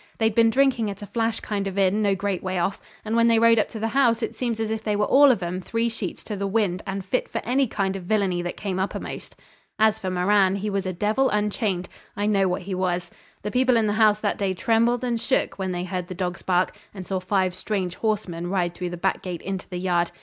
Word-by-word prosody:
They'd 220 -1 +2
been 230 +1 +5
drinking 255 -3 +2
at 200 +1 -7
a - - -5
flash 225 +2 -1
kind 200 -2 -2
of 195 0 -5
inn 200 +2 +3
no 200 -2 +2
great 195 -1 -2
way 185 -1 -2
off, 185 +3 -1 0.2
and 220 +1 -1
when 230 0 +4
they 230 -1 +4
rode 230 0 +5
up - - +1
to 220 - -7
the 225 +1 -1
house 235 -2 +2
it - - -2
seems 235 -3 -2
they 220 -1 -1
were 210 0 +2
all 285 +1 +6
of 230 -8 +2
'em 180 +2 -3
three 230 +4 -1
sheets 225 - -6
in 205 - -3
the 200 - -1
wind, 195 -3 0
and 195 -1 -4
fit 255 +6 -1
for - - -4
any 260 +3 +2
kind 195 -3 -1
of 190 -2 -6
villainy 195 -3 +1
that 175 0 -5
came 190 -2 -3
uppermost. 190 - -4 0.4
As 220 0 +3
for 190 -3 -3
Moran, 190 +1 +3
he 205 +1 -3
was 195 -1 -1
a - - -1
devil 215 +9 +1
unchained. 210 -3 -1 0.3
I 205 - 0
know 200 -2 +3
what 180 +1 -2
he 190 +1 -5
was. 180 -1 -1 0.3
The 210 - -3
people 255 0 +3
in 225 - +2
the 205 - +1
house 215 -1 +4
that 205 - -1
day 195 -2 0
trembled 230 +5 +2
and 235 -2 -1
shook 260 - 0
when 190 -1 -2
they 175 0 -2
heard 180 -1 -4
the 185 - -7
dogs 180 -1 -3
bark 180 0 +1 0.2
and 190 -2 -7
saw 190 0 -2
five 185 -1 0
strange 185 -1 -2
horsemen 195 -6 -2
ride 175 -2 0
through 180 0 -4
the 175 - -6
back 190 +2 0
gate 180 -2 -6
into 190 -1 -5
the 180 - -4
yard. 175 -1 +1
200 Hz, 250 wpm, -24 LUFS, 185-225 Hz, 0.4 s, all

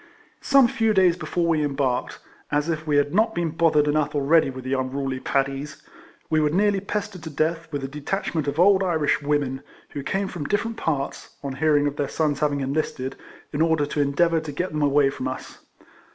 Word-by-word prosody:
Some 275 -3 +5
few 225 -2 +1
days 185 -3 +5
before 175 -1 -2
we 160 -2 +2
embarked 135 -3 -1 0.3
(as 145 +2 +1
if 160 -1 -3
we 145 -1 +2
had 145 +1 +1
not 220 +3 +2
been 170 -2 -1
bothered 155 -2 +3
enough 150 0 0
already 145 +1 +3
with 130 -1 -7
the 130 +1 -2
unruly 130 0 -2
Paddies), 140 +2 -2 0.5
we 155 - +2
were 150 -1 +2
nearly 200 +4 +2
pestered 200 -1 -4
to 160 - -7
death 160 +2 -1
with 145 -2 -3
a - - -2
detachment 150 +2 -3
of 140 +3 -2
old 195 +2 +5
Irish 160 -6 +1
women, 145 -2 -1 0.3
who 140 - -5
came 195 +7 -1
from 170 -6 -6
dif 205 +7 +1
ferent 230 0 -5
parts 145 -7 -3
(on 140 -1 -3
hearing 145 +1 +2
of 145 0 -2
their 145 - -1
sons 150 -3 0
having 145 -2 0
enlisted), 135 -1 -2 0.4
in 145 - -1
order 160 -2 +2
to 150 0 -1
endeavour 165 +4 +2
to 155 -1 -6
get 180 +6 -3
them 150 0 -2
away 140 -1 +3
from 130 - -4
us. 130 - -7
150 Hz, 205 wpm, -24 LUFS, 140-170 Hz, 0.5 s, Some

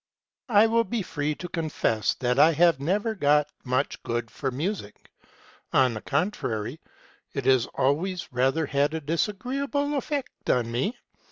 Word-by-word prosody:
" - - -67
I 210 -1 +6
will 230 +1 +3
be 230 0 -2
free 150 -3 -2
to 180 - -7
confess 155 - 0
that 125 +1 0
I 160 +2 +6 0.2
never 205 +10 0
cared 150 -6 +3 0.2
much 130 +2 -1 0.3
for 135 - -3
music: 145 - -5 0.6
on 130 -2 +4
the 110 - -5
contrary, 140 - -2 0.6
it 140 -3 -2
has 130 -3 +4
always 170 +7 0
rather 135 +6 +2
had 145 +3 +1
a - - -1
disa 165 +7 0
greeable 280 +6 -2
effect 280 -1 -4
on 120 -2 +2
me. 135 - -1
150 Hz, 150 wpm, -26 LUFS, 130-205 Hz, 0.6 s, I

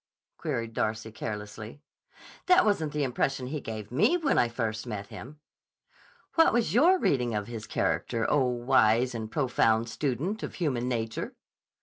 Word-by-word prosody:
queried 120 -8 -3
Darcy 110 +1 -2
carelessly. 105 +3 -6 0.7
"That 365 0 +6
wasn't 160 -8 +1
the 150 0 -1
impression 130 0 -1
he 145 +3 -4
gave 110 -2 -7
me 170 - +3
when 310 -5 +2
I 120 - +4
first 110 -2 -3
met 100 -1 -5
him." 145 +4 -10 0.9
"What 325 - +5
was 230 -8 +1
your 335 - +5
reading 125 - +1
of 105 -1 -2
his 115 -2 -7
character, 115 -1 -1
oh, 140 -3 +3
wise 120 -1 +3
and 110 -2 -5
profound 115 -4 +2
student 150 - -2
of - - -6
human 130 -8 -1
nature?" 115 -2 -3
125 Hz, 150 wpm, -28 LUFS, 110-150 Hz, 0.9 s, That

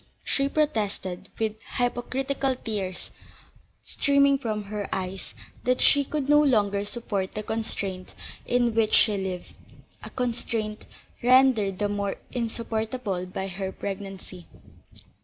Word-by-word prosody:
She 275 0 +1
protested, 205 -10 -1
with 220 -1 -1 0.2
hypocritical 260 +2 0
tears 200 -7 -4 0.7
streaming 280 -1 +3
from 215 -5 -2
her 205 0 -4
eyes, 190 0 -4 0.3
that 255 +1 +2
she 285 - +6
could 280 0 -2
no 295 +1 +6
longer 205 -7 +2
support 205 -3 -3
the 215 - -3
constraint 200 -4 -3 0.3
in 240 -1 +2
which 220 -1 +3
she 215 -2 +5
lived; 190 -2 -4 0.5
a - - -8
constraint 230 -3 -2 0.3
rendered 245 -6 +5
the 205 - +1
more 200 -1 -1 0.2
insupportable 225 -4 -2
by 190 +1 -4
her 190 0 -4
pregnancy. 195 -2 -7
215 Hz, 120 wpm, -26 LUFS, 195-250 Hz, 0.7 s, she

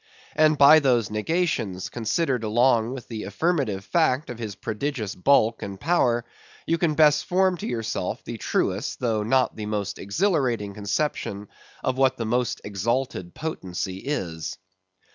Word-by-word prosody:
And 155 -1 +4
by 140 +3 +8
those 120 -7 +2
negations, 105 - -1
considered 125 +2 -1
along 115 +1 +3
with 130 - -9
the 110 -3 -5
affirmative 110 - -1
fact 150 -6 +1
of 120 - -8
his 110 -4 -5
prodigious 110 -1 -3
bulk 115 +1 +3
and 100 -1 -6
power, 120 - +2 0.4
you 165 0 0
can 160 -3 +1
best 150 -1 +4
form 185 0 +2
to - - -5
yourself 115 -2 -3
the - - -7
truest, 100 +8 -1
though 115 -4 0
not 130 +4 +2
the 105 -1 -5
most 105 -2 -3
exhilarating 120 - 0
conception 100 -1 -2 0.3
of 130 0 -1
what 135 -1 +3
the 115 - -3
most 120 +1 -1
exalted 105 -2 -2
potency 95 - -4
is. 90 - -4
120 Hz, 145 wpm, -25 LUFS, 105-145 Hz, 0.4 s, by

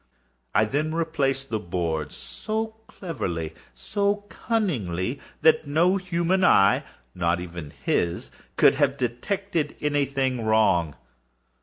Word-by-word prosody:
I 110 +2 +5
then 150 +7 -1
replaced 140 -5 -1
the 110 - 0
boards 85 -5 -2
so 220 +1 -4
cleverly, 85 - -4 0.2
so 205 0 -1
cunningly, 130 - -1 0.2
that 155 -1 +5
no 170 +6 +3
human 185 0 0
eye—not 85 - +2
even 85 -4 -7
his—could 85 0 +1
have - - +1
detected 150 - -2
any 145 -1 +1
thing 130 -3 -1
wrong. 100 -8 +3
135 Hz, 105 wpm, -25 LUFS, -, 0.2 s, I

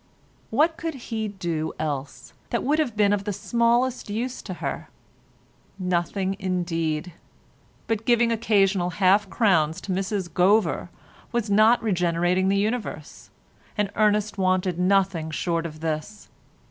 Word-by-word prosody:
What 315 +8 +2
could 330 -2 -4
he 225 -4 -4
do 170 -6 -3
else 145 -3 -5 0.2
that 235 - -1
would 300 +4 +1
have 245 -9 -1
been 205 -1 +4
of 200 -1 -1
the 205 - -2
smallest 235 +4 +1
use 240 +5 -3
to 185 - -6
her? - - -5 0.9
Nothing 185 +1 -1
indeed; 170 -3 -2 0.7
but 225 -1 -1
giving 235 0 +3
occasional 195 -5 +2
half 200 +1 +4
crowns 170 -8 +2
to 195 - -5
Mrs 190 0 -1
Gover 180 0 +2 0.4
was 235 -3 -1
not 220 +4 +5
regenerating 180 -1 +1
the 200 - +2
universe, 215 +4 -3 0.5
and 205 -1 0
Ernest 210 -1 +1
wanted 185 -1 +1
nothing 185 -3 +2
short 165 +1 -1
of 155 -1 -12
this. 160 +6 -4
195 Hz, 135 wpm, -24 LUFS, 175-220 Hz, 0.9 s, not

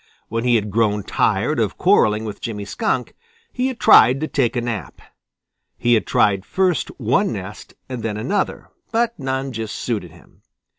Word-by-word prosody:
When 115 +2 -2
he 120 -1 +4
had 105 -2 0
grown 105 -1 +1
tired - - 0
of - - -1
quarreling 105 +1 +3
with 105 -2 -7
Jimmy 105 -3 -5
Skunk, 220 - -2 0.4
he 255 +1 0
had 260 -3 -5
tried 125 +4 +6
to 155 - -1
take 130 -5 0
a 120 - 0
nap. 115 -6 -5 0.8
He 120 0 +2
had 110 - +2
tried 95 -2 +2
first 185 - 0
one 135 - +1
nest 100 -1 -8
and 125 -3 -5
then 110 -1 -3
another, 190 - -2 0.2
but 235 -1 0
none 135 0 -2
just 110 -3 -5
suited 105 -8 -3
him. 85 +1 -20
115 Hz, 170 wpm, -20 LUFS, 105-135 Hz, 0.8 s, tried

